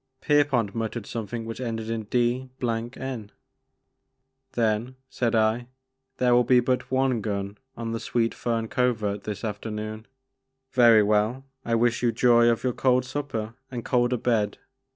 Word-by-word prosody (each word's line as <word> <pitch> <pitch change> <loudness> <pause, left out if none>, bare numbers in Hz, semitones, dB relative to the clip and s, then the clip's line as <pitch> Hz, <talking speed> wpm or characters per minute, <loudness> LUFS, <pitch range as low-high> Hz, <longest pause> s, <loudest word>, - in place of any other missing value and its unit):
Pierpont 140 -8 +2
muttered 115 -1 -3
something 115 0 -5
which 115 +2 -6
ended 115 -2 -3
in 115 -1 -3
"d— 125 +3 0
n." 120 -1 -3 1.2
"Then," 115 +2 0 0.2
said 120 -2 0
I, 110 +2 +2 0.5
"there 125 -1 +3
will 120 0 +5
be 125 +1 +5
but 125 +1 0
one 130 -3 +1
gun 100 -1 -3 0.2
on 115 -1 -4
the 115 - -2
Sweet 115 -1 0
Fern 115 -1 -2
Covert 110 -5 0
this 105 -2 -5
afternoon. 110 +1 -5 0.6
Very 115 -4 +6
well, 105 +5 +1 0.2
I 115 - 0
wish 120 0 +2
you 120 -1 +3
joy 120 -1 +5
of 115 - 0
your 125 -1 +1
cold 130 0 +2
supper 125 -5 -4 0.2
and 120 -3 -6
colder 125 0 +2
bed. 110 -4 0
115 Hz, 150 wpm, -26 LUFS, 110-125 Hz, 1.2 s, Very